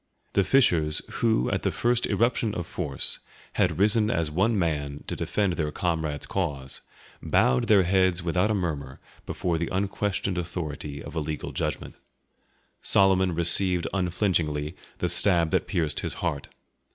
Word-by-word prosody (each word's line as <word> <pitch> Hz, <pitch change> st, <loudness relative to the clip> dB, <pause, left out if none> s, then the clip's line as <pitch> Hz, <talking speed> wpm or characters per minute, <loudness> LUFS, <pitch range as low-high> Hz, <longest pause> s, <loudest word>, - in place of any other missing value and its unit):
The 100 Hz, -, +3 dB
fishers 85 Hz, -, +3 dB
who, 110 Hz, -, +2 dB
at -, -, 0 dB
the -, -, +1 dB
first 120 Hz, 0 st, +1 dB
irruption 115 Hz, -2 st, +1 dB
of 85 Hz, -, -3 dB
force, 75 Hz, -7 st, -1 dB, 0.3 s
had -, -, +1 dB
risen 105 Hz, +2 st, +4 dB
as 80 Hz, -5 st, 0 dB
one 105 Hz, +8 st, +2 dB
man 75 Hz, -5 st, -2 dB
to -, -, -4 dB
defend 100 Hz, -4 st, 0 dB
their 75 Hz, -3 st, -2 dB
comrade's 80 Hz, -4 st, -2 dB
cause, 70 Hz, -2 st, -3 dB, 0.4 s
bowed 65 Hz, 0 st, +2 dB
their 100 Hz, -3 st, +6 dB
heads 95 Hz, -1 st, +2 dB
without 90 Hz, +4 st, +1 dB
a 110 Hz, -, +2 dB
murmur 75 Hz, -8 st, -3 dB, 0.3 s
before 85 Hz, -3 st, -1 dB
the 85 Hz, -, -2 dB
unquestioned 95 Hz, -1 st, -1 dB
authority 75 Hz, -4 st, -5 dB
of -, -, -9 dB
a 80 Hz, -, -1 dB
legal 75 Hz, -1 st, -4 dB
judgment. -, -, -3 dB, 0.9 s
Solomon 95 Hz, -2 st, +3 dB
received 90 Hz, +1 st, +1 dB
unflinchingly 85 Hz, -5 st, 0 dB, 0.2 s
the -, -, -1 dB
stab 85 Hz, -5 st, +2 dB
that -, -, +1 dB
pierced 80 Hz, -6 st, 0 dB
his -, -, -4 dB
heart. 70 Hz, -, -3 dB
85 Hz, 150 wpm, -26 LUFS, 75-95 Hz, 0.9 s, their